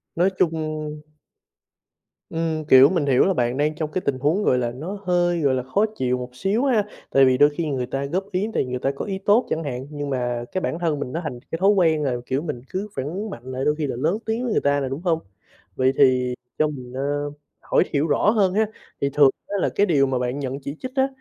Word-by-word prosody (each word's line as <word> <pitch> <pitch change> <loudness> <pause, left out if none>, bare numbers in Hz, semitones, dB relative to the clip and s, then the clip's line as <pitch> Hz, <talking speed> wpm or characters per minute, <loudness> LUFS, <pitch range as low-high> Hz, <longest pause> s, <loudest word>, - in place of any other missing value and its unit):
Nói 180 +3 +3
chung 155 -2 -1 1.3
Ừm, 160 -1 -2
kiểu, 135 0 +8
mình 170 -6 0
hiểu 130 -2 +4
là 195 - +2
bạn 120 -4 0
đang 150 +2 +1
trong 155 -1 -3
cái 185 - -1
tình 135 -2 0
huống, 155 +10 +1
gọi 125 - +3
là, 120 -1 -1
nó 175 +11 -6
hơi, 175 -1 +2
gọi 140 -3 +2
là, 130 - -2
khó 200 +12 +1
chịu 125 -4 0
một 125 0 -6
xíu 200 - 0
ha, 235 -6 +3 0.3
tại 135 0 +5
vì 130 -1 +3
đôi 145 +2 +6
khi 160 +3 -3
người 130 -3 -1
ta 135 +2 -3
góp 190 +7 -3
ý 190 +2 0
tại - - +1
vì 125 - -7
người 125 0 -3
ta 135 - 0
có - - -4
ý 195 -1 -3
tốt 210 +5 +3
chẳng 160 - -1
hạn, 130 -2 -5
nhưng 145 -1 -5
mà 120 -2 -1
cái 185 - -2
bản 165 - -2
thân 160 -4 0
mình 125 - -4
nó 165 - -2
thành 125 -6 -5
cái 165 - -2
thói 195 +2 +4
quen 165 -7 +3
là, 130 -3 0
kiểu, 130 +3 -1
mình 150 -7 -5
cứ 195 +3 -3
phản 130 - -2
ứng 195 +9 -4
mạnh 120 - -8
lại, 130 +1 -3
đôi 150 - +2
khi 150 -2 -2
là 130 - -3
lớn 160 - 0
tiếng 225 +2 -1
với 245 - -1
người - - +2
ta 140 0 +2
nè, 135 - -2
đúng 135 +4 -4
hông? 170 -3 +1 0.6
Vậy 130 0 +2
thì 125 -2 +4 0.2
cho 155 - +3
mình, 130 -4 -8
ơ, 145 +2 -2 0.3
hỏi - - +2
hiểu 145 +2 +2
rõ 150 +7 +3
hơn 200 -4 +3
ha, 220 +2 +3 0.4
thì 140 - +2
thường 145 -2 +6 0.2
á 200 - -2
là - - +2
cái 205 - +4
điều 145 -8 +3
mà 130 -1 -1
bạn 125 +3 -2
nhận 135 -1 -3
chỉ 140 +1 -6
trích 255 - -6
á 265 0 +3
150 Hz, 265 wpm, -23 LUFS, 130-180 Hz, 1.3 s, kiểu